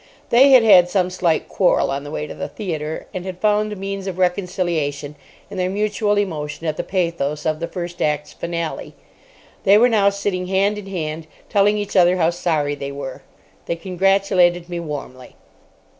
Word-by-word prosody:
They 260 +4 +7
had 260 -3 +7
had 185 -5 +7
some 185 -1 +1
slight 170 -3 0
quarrel 185 -7 +2
on 140 +1 -3
the 145 - -8
way 150 0 -4
to - - -8
the - - -5
theatre, 160 -6 -5
and 185 - -4
had 185 -1 -6
found 210 +1 +1
a - - -4
means 195 0 -5
of 185 -2 -4
reconciliation 175 -6 -1 0.4
in - - -7
their 180 0 0
mutual 210 +1 0
emotion 160 -5 -3
at 155 - -1
the - - -3
pathos 165 -5 -2
of 155 -1 0
the 170 - -3
first 175 -1 -6
act's 150 0 -1
finale. 170 -1 -5 0.7
They 200 0 +6
were 245 +3 +5
now 205 -3 +4
sitting 200 -2 -3
hand 200 +2 +1
in 200 - -10
hand 160 -4 -4 0.2
telling 205 +1 +3
each 205 -1 -4
other 180 0 +5
how 165 -1 +2
sorry 160 -4 -1
they 140 -1 -5
were. 140 -2 -7 0.5
They 170 - -1
congratulated 180 -1 +2
me 175 -1 -4
warmly. 140 -5 -7
180 Hz, 185 wpm, -20 LUFS, 155-195 Hz, 0.7 s, They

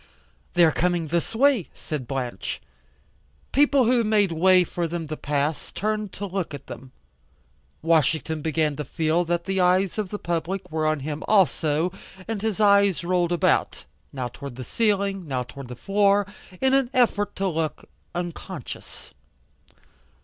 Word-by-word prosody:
"They 175 -1 +7
are 160 - +4
coming 175 -1 0
this 170 +6 -1
way," 260 - +3
said 145 -6 -5
Blanche. 125 -7 -4 0.9
People 280 -1 +4
who 240 0 +3
made 210 -4 +3
way 180 +3 +5
for 175 -1 -3
them 165 -1 -4
to 155 - -3
pass, 145 +1 -2
turned 215 -1 -2
to 205 - -5
look 185 -5 -3
at 140 - -11
them. 130 +1 -10 0.9
Washington 160 -1 +2
began 155 -1 0
to 150 - -2
feel 160 +4 0
that 170 0 -1
the 190 -1 0
eyes 185 +3 +2
of 205 -3 -2
the 205 - -4
public 175 +1 -3
were 155 -1 0
on 155 -2 0
him 150 +2 -4
also, 170 -4 +2 0.4
and 220 -3 -3
his 220 -2 -1
eyes 200 -3 +4
rolled 175 -1 +1
about, 175 - +1 0.3
now 130 -3 -3
towards 130 +1 -9
the 130 - -6
ceiling, 200 - 0
now 130 -3 -1
towards 125 +2 -10
the 125 - -6
floor, 200 - +2 0.3
in 265 0 +2
an 270 -2 +3
effort 205 -5 +2
to 195 - -1
look 160 -3 -2 0.3
unconscious. 175 -1 -6
175 Hz, 155 wpm, -24 LUFS, 155-200 Hz, 0.9 s, They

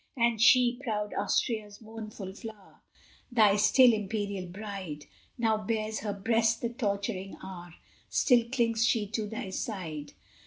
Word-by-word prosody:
And 235 -2 +2
she, 245 0 +5
proud 210 -4 -2
Austria's 205 0 -1
mournful 215 -3 -8
flower, 215 -1 -11 0.5
Thy 215 -4 +5
still 230 +4 +6
imperial 200 -2 -3
bride, 190 -6 -7 0.3
How 220 -2 +2
bears 215 +1 -2
her 205 0 -3
breast 225 +3 +1
the 235 - -1
torturing 200 -4 -3
hour? 175 -2 -9 0.3
Still 245 -3 +4
clings 230 -3 +1
she 225 -2 +2
to 215 -1 -2
thy 205 -3 -5
side? 160 -8 -5
215 Hz, 130 wpm, -29 LUFS, 200-230 Hz, 0.5 s, still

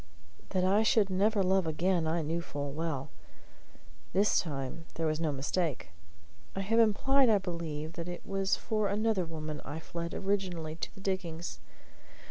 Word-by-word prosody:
That 185 -2 +1
I 195 +3 +4
should 215 -3 +3
never 200 +2 +3
love 190 -1 +3
again 170 +1 +1
I 165 +1 +1
knew 165 +3 -1
full 145 -4 -4
well. 150 - -3 1.0
This 200 +4 +4
time 145 0 -4
there 165 - -1
was 155 0 +1
no 160 -2 +1
mistake. 145 - -1 0.7
I 195 - -1
have 225 +4 +2
implied, 255 +4 +5
I 215 - +6
believe, 165 -4 -4
that 170 +1 -5
it 175 - -7
was 195 0 +1
for 215 -2 0
another 210 -2 +1
woman 155 -2 -5
I 145 +3 -5
fled 170 +1 -5
originally 185 -5 -1
to - - -4
the 195 - -11
diggings. 175 -4 -3
175 Hz, 160 wpm, -31 LUFS, 160-195 Hz, 1.0 s, I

